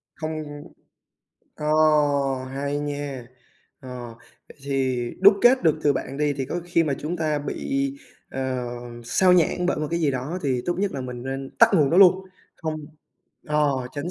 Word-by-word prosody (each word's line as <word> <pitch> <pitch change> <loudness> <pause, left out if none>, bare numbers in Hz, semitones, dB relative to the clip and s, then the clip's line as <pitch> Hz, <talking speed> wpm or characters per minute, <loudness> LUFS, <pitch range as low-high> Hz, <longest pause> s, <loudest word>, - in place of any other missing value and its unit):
Không 155 -2 -6 0.9
ờ, 150 - -5 0.9
hay 140 +1 -2
nha! 145 -3 -5 0.5
Ờ, 125 -3 -8 0.3
vậy - - -16
thì 130 -3 -1
đúc 200 +2 +8
kết 250 +2 +6
được 155 -2 +3
từ 145 - +4
bạn 130 0 -4
đi 145 0 +1
thì 135 -1 -3
có 175 +7 -4
khi 170 -1 +2
mà 145 -3 0
chúng 160 +4 -3
ta 155 -3 0
bị, 275 - -2 0.4
ờ, 130 -1 -3 0.4
xao 180 +9 +3
nhãng 180 0 +2
bởi 185 - +1
một 155 - -2
cái 170 - -1
gì 150 -3 +2
đó 135 +7 -3
thì 130 -3 0
tốt 175 - +1
nhất 200 0 0
là 135 - -4
mình 125 -1 -6
nên 135 +1 -5
tắt - - +8
nguồn 150 -6 +4
đó 170 - +2
luôn, 190 0 +6 0.3
không 160 -1 -3 0.7
ờ, 150 -1 +2 0.2
tránh 150 +4 -4
145 Hz, 175 wpm, -24 LUFS, 135-170 Hz, 0.9 s, đúc